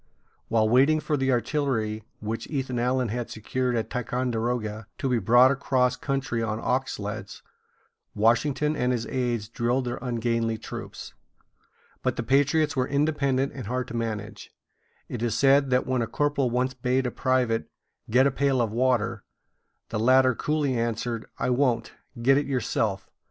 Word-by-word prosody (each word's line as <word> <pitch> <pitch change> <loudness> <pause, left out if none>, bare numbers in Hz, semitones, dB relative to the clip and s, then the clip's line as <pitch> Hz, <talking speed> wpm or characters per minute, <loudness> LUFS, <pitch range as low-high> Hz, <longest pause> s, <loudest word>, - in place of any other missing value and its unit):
While 110 -1 +2
waiting 135 +7 +4
for 150 - -1
the 135 -1 +1
artillery 120 -5 -1 0.2
which 110 +2 -4
Ethan 130 -4 -2
Allen 125 0 +1
had 120 +2 -3
secured 125 +3 -2
at 115 - -2
Ticonderoga 120 -3 -2
to - - -2
be 125 -2 +2
brought 120 +6 +6
across 130 -2 +1
country 135 -4 -2
on 110 -1 -1
ox 130 +3 -1
sleds, 105 -1 -6 0.7
Washington 140 +7 +2
and 125 -2 +1
his 120 -2 -1
aids 120 -4 -2
drilled 120 +3 -1
their 120 - -3
ungainly 115 -2 -1
troops. - - -8 0.9
But - - 0
the - - -3
patriots 145 +3 +2
were 130 -1 +1
independent 140 -2 +1
and 130 -6 -7
hard 125 +2 -2
to 120 - -6
manage. 110 -2 -4 0.6
It 120 - -5
is 115 -2 0
said 140 +2 +4
that 125 0 +2
when 130 -1 0
a 115 - -1
corporal 145 +1 0
once 125 +2 0
bade 130 +1 0
a 125 - -1
private 125 -4 0 0.4
get 125 +4 +4
a 140 - +3
pail 135 0 +1
of 115 -3 +1
water, 115 -3 +1 0.7
the 110 - -2
latter 130 +2 +5
coolly 150 +1 0
answered: 115 0 -2
"I - - 0
won't. 125 -2 +1 0.3
Get 135 +4 +4
it 145 - -3
yourself. 110 -6 -1
125 Hz, 160 wpm, -26 LUFS, 115-135 Hz, 0.9 s, brought